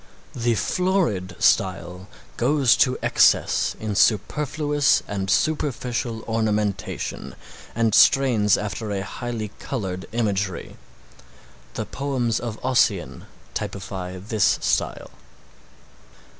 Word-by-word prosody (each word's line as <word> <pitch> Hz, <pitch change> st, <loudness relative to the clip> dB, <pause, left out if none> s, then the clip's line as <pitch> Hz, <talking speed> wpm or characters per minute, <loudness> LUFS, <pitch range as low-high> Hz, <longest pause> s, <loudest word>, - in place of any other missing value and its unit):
The 120 Hz, -1 st, 0 dB
florid 170 Hz, -, 0 dB
style 95 Hz, -2 st, +1 dB, 0.3 s
goes 135 Hz, 0 st, +3 dB
to 125 Hz, -, +3 dB
excess -, -, +3 dB
in 110 Hz, -1 st, -3 dB
superfluous 145 Hz, +8 st, +2 dB
and 95 Hz, -1 st, -3 dB
superficial 125 Hz, -4 st, -1 dB
ornamentation 105 Hz, -3 st, -2 dB, 0.4 s
and 115 Hz, -2 st, +1 dB
strains 115 Hz, -7 st, +5 dB
after 105 Hz, +1 st, -4 dB
a 100 Hz, -1 st, -2 dB
highly 115 Hz, 0 st, -5 dB
colored 95 Hz, -8 st, -4 dB
imagery. 100 Hz, -5 st, -2 dB, 1.0 s
The -, -, -3 dB
poems 130 Hz, -5 st, -1 dB
of 115 Hz, -2 st, -5 dB
Ossian 115 Hz, -8 st, +1 dB, 0.3 s
typify 95 Hz, -2 st, -5 dB
this 105 Hz, +2 st, +1 dB
style. -, -, -1 dB
110 Hz, 90 wpm, -23 LUFS, 100-125 Hz, 1.0 s, strains